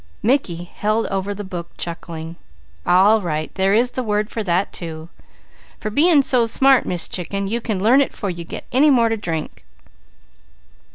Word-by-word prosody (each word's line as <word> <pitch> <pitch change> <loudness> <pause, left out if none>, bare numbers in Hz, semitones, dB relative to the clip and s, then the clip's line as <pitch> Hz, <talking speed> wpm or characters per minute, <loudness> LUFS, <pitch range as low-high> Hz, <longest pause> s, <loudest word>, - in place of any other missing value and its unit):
Mickey 205 -9 0
held 215 +5 -1
over 195 +1 -2
the 205 - -6
book 175 -3 -7
chuckling. 165 -1 -6 0.5
"All 205 +5 +5
right! 155 -3 -3
There 195 +1 +2
is 245 +2 +2
the 255 - -3
word 210 -2 -1
for 225 - -3
that, 185 0 0
too. 160 -1 -7 0.7
For 215 - -4
being 300 +3 +5
so 245 -3 +3
smart, 265 +3 +4
Miss 175 -2 0
Chicken, 195 +2 -3
you 235 +4 -2
can 210 -5 -3
learn 250 +6 +5
it 275 - 0
'fore 200 -3 -4
you 170 -1 -7
get - - -8
any 275 +4 +4
more 235 -4 +4
to 225 - -1
drink. 165 -6 -5
205 Hz, 175 wpm, -20 LUFS, 175-235 Hz, 0.7 s, All